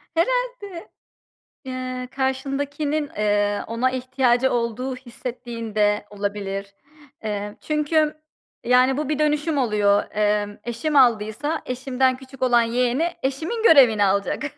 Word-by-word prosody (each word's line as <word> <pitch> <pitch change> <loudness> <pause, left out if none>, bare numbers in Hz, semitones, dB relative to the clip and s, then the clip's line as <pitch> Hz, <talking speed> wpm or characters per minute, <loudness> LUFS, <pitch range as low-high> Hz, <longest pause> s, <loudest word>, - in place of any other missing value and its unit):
Herhâlde. 450 -2 -1 0.8
Eee, 255 -1 -5
karşındakinin, 285 +3 -2
eee, 205 -1 +1
ona 235 +3 0
ihtiyacı 255 0 +1
olduğu 240 +2 -2
hissettiğin 240 -3 -7
de 210 -1 +2
olabilir. 200 -1 -4 0.5
Eee, 210 -1 -4
çünkü, 305 0 +1 0.5
yani, 255 +2 +4
bu 300 -1 -2
bir 305 -1 -1
dönüşüm 300 +1 +1
oluyor. 210 -5 +2
Emm, 210 -1 0
eşim 240 +6 -3
aldıysa 245 +4 +2
eşimden 255 0 0
küçük 265 0 -14
olan 245 -2 +4
yeğeni 245 +6 +1 0.2
eşimin 320 - -2
görevini 255 - +6
alacak. 200 +7 0
255 Hz, 110 wpm, -23 LUFS, 215-285 Hz, 0.8 s, görevini